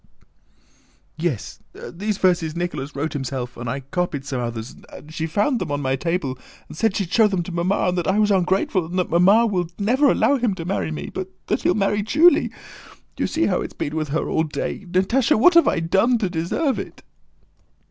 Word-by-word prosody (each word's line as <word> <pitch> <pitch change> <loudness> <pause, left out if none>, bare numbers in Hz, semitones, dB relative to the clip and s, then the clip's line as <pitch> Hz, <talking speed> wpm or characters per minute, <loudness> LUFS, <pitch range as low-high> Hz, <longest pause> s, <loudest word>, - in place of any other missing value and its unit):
"Yes, 155 -8 -3 0.2
these 205 +3 -4
verses 175 -5 +1
Nicholas 150 -5 -4
wrote 145 +3 -2
himself 130 -3 -4
and 120 0 -5
I 135 +4 -3
copied 145 0 -3
some 130 -3 -3
others, 115 0 -5 0.2
and 155 +1 -12
she 160 0 -2
found 205 - +1
them 165 -5 -3
on 145 - -1
my 135 -2 0
table 145 -4 -2 0.3
and - - -11
said 210 +4 +1
she'd 190 -4 -3
show 225 -2 +5
them 190 -4 -1
to 180 - -7
Mamma, 175 +3 0
and 180 - -2
that 170 - -3
I 190 - +2
was 210 -1 +3
ungrateful, 190 0 +1
and 180 +2 -5
that 180 - -1
Mamma 195 +7 +5
would 180 -5 -2
never 255 +8 +3
allow 280 - +3
him 235 -6 0
to 165 - -6
marry 95 - -1
me, 75 -2 -6
but 190 -1 -4 0.2
that - - -1
he'll 180 - +2
marry 205 0 +1
Julie. 305 +12 +4 0.7
You - - -1
see 325 - 0
how 185 - +1
he's - - -6
been 145 - -4
with 155 -1 -1
her 150 +3 -2
all - - +1
day... 155 +5 -4
Natásha, 195 +9 +2
what 355 +9 +6
have 335 0 +6
I 185 - +2
done 195 +9 +2
to 195 -5 -2
deserve 180 - -1
it?..." - - -8
175 Hz, 210 wpm, -22 LUFS, 150-205 Hz, 0.7 s, what